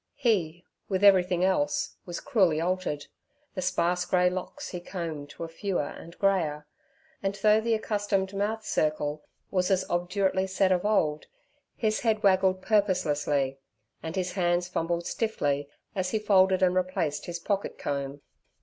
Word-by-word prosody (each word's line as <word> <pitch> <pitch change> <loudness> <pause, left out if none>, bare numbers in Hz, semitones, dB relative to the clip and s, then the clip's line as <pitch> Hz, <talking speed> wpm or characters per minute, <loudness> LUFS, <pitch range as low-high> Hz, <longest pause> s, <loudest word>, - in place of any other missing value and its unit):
He, 185 - 0 0.2
with 190 0 0
everything 185 -3 +5
else, 290 +9 +1
was 175 - -4
cruelly 190 - +2
altered. 175 -4 -1 0.5
The 185 - -3
sparse 180 -1 +1
grey 180 0 +2
locks 185 0 -5
he 180 - -5
combed 165 -5 -6
were 165 - -5
fewer 170 -1 -2
and 170 +1 -11
greyer: 165 -7 +1 0.6
and 195 0 -1
though 210 +2 +4
the 230 0 +1
accustomed 205 -3 -1
mouth 215 +2 -2
circle 150 -1 0 0.3
was 185 -2 +1
as 190 -1 +1
obdurately 190 +2 +1
set 190 0 +2
as 180 - +4
of 180 - -8
old, 155 -8 +1 0.5
his 215 -2 0
head 225 -5 0
waggled 185 -1 +3
purposelessly: 150 -10 +1 0.4
and 160 +1 -5
his 185 -1 -1
hands 175 -1 +1
fumbled 170 -1 -2
stiffly 145 -12 -1 0.2
as 185 -1 -1
he 220 - 0
folded 190 -3 +4
and 180 -1 +4
replaced 180 -5 -1
his 175 0 -3
pocket 200 +4 -2
comb. 140 0 -3
185 Hz, 150 wpm, -28 LUFS, 170-200 Hz, 0.6 s, everything